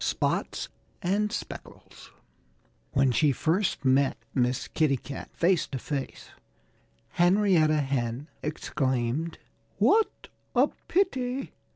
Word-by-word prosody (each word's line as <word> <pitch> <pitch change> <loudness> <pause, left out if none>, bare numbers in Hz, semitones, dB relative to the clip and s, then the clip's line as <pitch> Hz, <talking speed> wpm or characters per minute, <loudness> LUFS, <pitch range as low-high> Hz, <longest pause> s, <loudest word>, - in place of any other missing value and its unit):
V - - -1
SPOTS - - -1 0.4
AND 205 +4 +1
SPECKLES - - -8 0.8
WHEN 135 -1 +4
she 145 +4 +3
first 165 +4 0
met 135 +1 +3 0.2
Miss 125 0 0
Kitty 150 -4 +2
Cat 135 +2 -8
face 175 0 +2
to 135 - -4
face 135 +1 -5 0.8
Henrietta 175 -4 +4
Hen 135 0 -2
exclaimed, 135 0 -1 0.4
"What 445 0 +2 0.3
a - - +5 0.2
pity!" 270 -8 0
150 Hz, 100 wpm, -28 LUFS, 135-190 Hz, 0.8 s, a